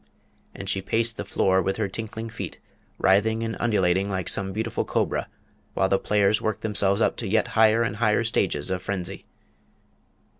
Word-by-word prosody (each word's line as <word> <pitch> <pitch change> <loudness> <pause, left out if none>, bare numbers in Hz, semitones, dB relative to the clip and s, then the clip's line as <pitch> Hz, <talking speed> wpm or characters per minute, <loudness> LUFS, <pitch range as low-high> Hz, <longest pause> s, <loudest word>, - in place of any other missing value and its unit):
And 95 - -7
she 95 -1 0
paced 115 +4 0
the - - -3
floor 95 0 +2
with 95 +2 -1
her 110 -2 0
tinkling 110 +3 -5
feet, 115 - -6 0.4
writhing 110 +4 +2
and 115 0 -3
undulating 95 -4 +1
like 95 -2 -2
some 95 0 +1
beautiful 110 +3 -2
cobra, - - -1 0.5
while 95 - +2
the 95 - +2
players 105 0 +2
worked 110 - -2
themselves 100 -1 +2
up - - +2
to - - -4
yet 110 +2 +1
higher 110 +1 +4
and 105 -2 -3
higher 110 +1 +2
stages 95 -7 0
of 90 -1 -2
frenzy. 95 -2 -4
105 Hz, 175 wpm, -25 LUFS, 95-110 Hz, 0.5 s, higher